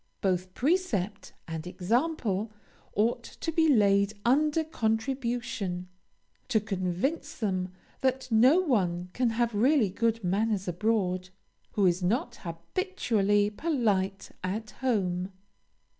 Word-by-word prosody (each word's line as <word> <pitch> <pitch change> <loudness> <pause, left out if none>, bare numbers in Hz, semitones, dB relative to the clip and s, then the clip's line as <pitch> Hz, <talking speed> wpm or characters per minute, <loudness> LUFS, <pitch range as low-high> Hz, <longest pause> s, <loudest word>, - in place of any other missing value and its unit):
Both 185 -1 -1
precept 225 - 0
and 160 0 -5
example 220 - 0 0.4
ought 230 +3 +2
to 325 - -5
be 320 0 +3
laid 200 -3 +4
under 300 +5 +3
contribution, 225 - -2 0.6
to 220 - +3
convince 205 - -2
them 185 -4 -1 0.3
that 260 0 0
no 255 +11 +6
one 180 - 0
can 250 -1 +1
have 235 0 0
really 235 -1 +3
good 230 +1 0
manners 195 +2 0
abroad, 185 -1 0 0.4
who 205 - +2
is 180 0 +3
not 235 +6 0
habitually 205 - 0
polite 205 - 0
at 210 +3 -3
home. 190 -7 0
215 Hz, 110 wpm, -29 LUFS, 185-250 Hz, 0.6 s, no